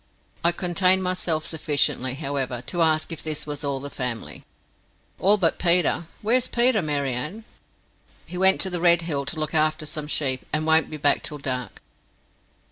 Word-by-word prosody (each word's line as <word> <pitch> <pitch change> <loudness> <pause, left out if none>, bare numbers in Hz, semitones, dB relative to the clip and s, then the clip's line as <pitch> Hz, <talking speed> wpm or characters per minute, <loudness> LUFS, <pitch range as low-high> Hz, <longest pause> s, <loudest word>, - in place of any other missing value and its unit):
I 170 - +4
contained 180 +2 +2
myself 180 -4 -1
sufficiently, 145 -4 0
however, 135 -4 -4
to 175 +5 -3
ask 155 0 +2
if 165 - -5
this 155 -1 -3
was 145 -1 -5
all 140 -1 -2
the 140 +1 -7
family. 115 - -5 0.8
"All 205 +2 +5
but 170 -5 +1
Peter. 175 -1 +2 0.2
Where's 240 +4 +2
Peter, 240 -2 +3
Mary 145 -4 -1
Ann?" 155 - -4 0.8
"He - - -10
went 190 +1 +4
to 190 - +1
the 175 -1 -2
Red 170 -1 +5
Hill 145 -4 -3
to 155 - -3
look 155 -1 -3
after 155 0 +1
some 150 0 -6
sheep, 135 -4 0
and 155 +1 0
won't 160 0 +3
be 155 - -6
back 145 -1 +2
till 150 - -4
dark." 125 -6 -5
155 Hz, 175 wpm, -23 LUFS, 140-175 Hz, 0.8 s, All